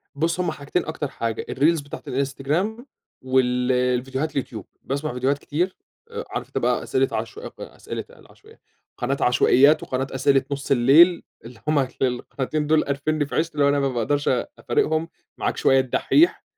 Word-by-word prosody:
بُصّ، 165 +4 0
هما 175 -3 0
حاجتين 150 +4 -3
أكتر 155 -2 -3
حاجة 115 -3 -4
الreels 150 +2 +2
بتاعة 145 - -9
الإنستجرام، 150 - -2 0.4
وال 125 -1 +1
الفيديوهات 125 +4 0
اليوتيوب، 115 -7 -4 0.2
باسمع 140 0 -3
فيديوهات 130 +3 0
كتير، 175 +6 -2 0.5
عارف - - -4
أنت - - -6
بقى - - +1
أسئلة - - +1
عش 435 - -4 0.2
أسئلة - - -7
قال - - -18
عشو 430 - -21 0.5
قناة 135 +3 -1
عشوائيات، 130 +4 +4
وقناة 130 +1 -2
أسئلة 135 0 +2
نُصّ 140 0 -4
الليل، 145 +8 +6 0.2
اللي 115 -1 -12
هم 155 -1 +3 0.2
القناتين 135 +3 -2
دول، 155 0 +3
قارفنّي 145 +2 -1
في - - -7
عيشتي، 165 +1 0
اللي 145 -1 +1
هو - - +4
أنا 145 0 +2
ما 140 -1 +1
باقدرش 130 +4 -1 0.3
أفارقهم، 155 +6 0 0.3
معاك - - -2
شوية 135 - +4
الدحيح، 210 - +2
140 Hz, 160 wpm, -23 LUFS, 130-155 Hz, 0.5 s, الليل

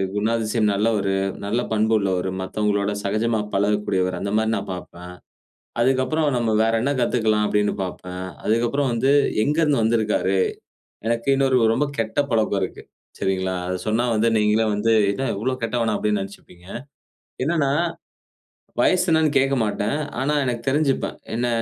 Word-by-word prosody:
குணாதிசயம் 110 0 +1
நல்லவரு. 100 -2 +1 0.3
நல்ல 115 +4 0
பண்புள்ளவரு. 100 -4 +1
மத்தவங்களோட 100 +1 -1
சகஜமா 110 +3 0 0.2
பழகக்கூடியவர். 100 -3 0
அந்த 100 +1 -3
மாரி 110 0 0
நான் - - -6
பார்ப்பேன், 90 0 -9 0.7
அதுக்கப்புறம், 135 +5 +1
நம்ம 115 -2 +1
வேற 115 0 +1
என்ன 140 +2 +1
கத்துக்கலாம்? 110 -3 +1
அப்பிடின்னு 105 0 +1
பார்ப்பேன், 90 0 -6 0.2
அதுக்கப்புறம் 120 +4 +1
வந்து 135 +4 +2 0.3
எங்கருந்து 150 -3 +2
வந்திருக்காரு? 110 -4 +1 0.7
எனக்கு 115 +2 -1
இன்னொரு 135 -2 +3 0.2
ரொம்ப 145 +5 +1
கெட்ட 115 +4 -1
பழக்கம் 110 -3 +1
இருக்கு, 95 - -4 0.4
சரிங்களா? 95 -1 -1
அதை 90 0 -2
சொன்னா 110 +3 +1
வந்து 110 +2 +2
நீங்களே 105 +1 +2
வந்து, 110 +2 +1 0.2
என்ன 135 +7 -2
இவ்வளோ 120 +6 -1
கெட்டவனா? 115 -1 0
அப்படினு 105 -1 0
நினைச்சுப்பீங்க. 95 -2 -11 0.8
என்னன்னா, 145 -1 +1 1.1
வயது 185 -1 +3
என்னனு 160 -1 +4
கேட்க 135 +1 +2
மாட்டேன். 105 +6 -1 0.2
ஆனா, 145 +3 0
எனக்கு 120 -2 -2
தெரிஞ்சுப்பேன். 140 -1 0 0.2
என்ன, 120 +1 0
110 Hz, 135 wpm, -22 LUFS, 100-125 Hz, 1.1 s, என்னனு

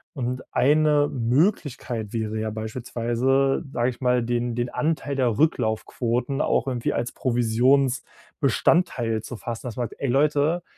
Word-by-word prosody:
Und 125 -1 -3
eine 150 +2 +3
Möglichkeit 125 - 0
wäre 110 -1 -2
ja 110 0 -2
beispielsweise, 120 +5 0
sage 120 -1 +1
ich 125 - -14
mal, 125 -1 +2
den 120 0 -1
den 120 0 -1
Anteil 150 -1 -1
der 125 -5 +1
Rücklaufquoten 125 -1 0
auch 130 - +1
irgendwie 125 -3 -1
als 120 +1 -2
Provisionsbestandteil 125 +1 +1
zu 120 +2 -8
fassen. 120 +2 -6
Das 115 - -7
man 120 -1 -1
sagt: - - -14
„Ey, 140 - 0
Leute, 150 +5 +2
125 Hz, 140 wpm, -24 LUFS, 115-140 Hz, -, eine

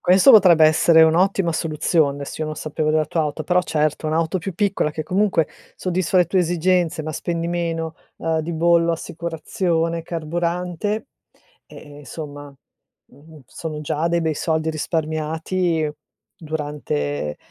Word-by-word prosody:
questo 185 +8 +6
potrebbe 180 -8 +7
essere 160 +1 +5
un'ottima 175 +2 +3
soluzione. 150 -3 0
Sì, 155 - -8
io 155 - -1
non 155 - -4
sapevo 155 0 -3
della 155 0 +2
tua 160 +2 -1
auto, 155 +1 -2
però 180 +2 +3
certo, 155 -2 -1
un'auto 160 +3 0
più 185 +1 -5
piccola 195 -5 0
che 155 +1 -4
comunque 185 -2 +1 0.3
soddisfa 185 0 -1
le 180 - +6
tue 185 +2 +1
esigenze, 175 -1 +1
ma 155 +1 -4
spendi 170 +2 -3
meno, 165 -2 -2 0.2
uhm, 160 -1 -1
di 165 +2 -3
bollo, 170 +1 +3
assicurazione, 165 0 -2
carburante 175 - -3 0.6
e, 145 -1 -13
ehm, - - -12
somma, 145 0 -8 0.5
mhmm, 150 +3 -17
sono 150 +7 -6
già 155 +2 -1
dei 170 0 +1
bei 160 -1 0
soldi 160 +1 -1
risparmiati 160 +1 -1 0.5
durante 145 - -3
160 Hz, 145 wpm, -21 LUFS, 155-175 Hz, 0.6 s, potrebbe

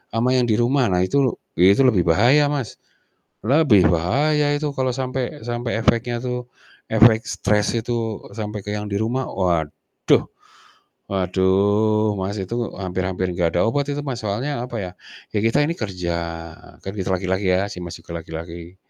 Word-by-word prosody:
ama 120 +3 +2
yang 125 -2 +2
di 110 - +2
rumah. 120 +3 +2
Nah 90 -2 +2
itu 135 +6 +1 0.2
itu 100 +8 +6
lebih 95 -10 +3
bahaya, 125 - +5
Mas, 140 -6 -3 0.7
lebih 125 - +5
bahaya 145 - +2
itu 145 -1 -3
kalau 130 -2 0
sampai 130 0 -3
sampai 120 -1 -2
efeknya 120 +1 +1
tuh 125 0 -4 0.4
efek 110 0 +6
stres 105 0 0
itu 115 -2 -2 0.2
sampai 105 -2 -5
ke 105 - -3
yang 105 0 -4
di 100 - -1
rumah. 120 +5 -1
Waduh, 85 -5 0 0.9
waduh, 100 +3 +2
Mas, 95 +2 -3
itu 95 +5 -4 0.2
hampir 95 -1 -2
hampir 95 0 -2
nggak 85 -2 0
ada - - +3
obat 140 +4 0
itu, 145 - -3
Mas, 130 -4 -4
soalnya 120 +6 -2
apa, 125 - -8
ya. 90 -3 -5 0.4
Ya - - +3
kita 115 +5 +3
ini 165 - -1
kerja, 90 - -3 0.7
kan 95 - -4
kita 95 -2 -3
laki-laki 95 +1 -1
ya, 95 +2 +1
si 90 - -7
Mas 85 -1 -7
juga 85 0 -7
laki-laki, 85 +2 -8
110 Hz, 165 wpm, -22 LUFS, 95-125 Hz, 0.9 s, itu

